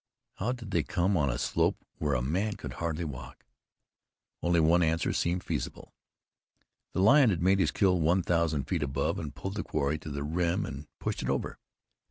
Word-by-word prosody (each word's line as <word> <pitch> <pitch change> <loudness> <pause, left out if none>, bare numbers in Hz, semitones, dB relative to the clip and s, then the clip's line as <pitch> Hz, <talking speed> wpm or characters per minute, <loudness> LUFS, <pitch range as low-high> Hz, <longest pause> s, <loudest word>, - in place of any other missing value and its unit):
How 110 +6 -1
did 120 -5 -6
they - - +2
come 95 +1 0
on 75 -5 +2
a - - -1
slope 65 - +1 0.2
where 75 -3 +1
a 60 - 0
man 95 +10 0
could - - -7
hardly 85 0 -1
walk? 70 -6 -8 1.0
Only 85 0 +3
one 85 +2 +4
answer 80 0 +1
seemed 90 +1 0
feasible. - - -4 1.0
The 95 - +1
lion 135 +3 +7
had 85 -4 0
made 95 +2 +4
his 85 -5 +3
kill 90 +2 +2
one 85 +4 +3
thousand 85 -5 +1
feet 80 +3 -2
above, 70 0 -1
had 75 -3 -5
pulled 95 +5 -5
his - - -1
quarry 75 0 -1
to 75 - -8
the 70 -1 -4
rim 85 +5 0
and 70 +2 -7
pushed - - -3
it - - -3
over. - - -2
85 Hz, 195 wpm, -29 LUFS, 75-95 Hz, 1.0 s, lion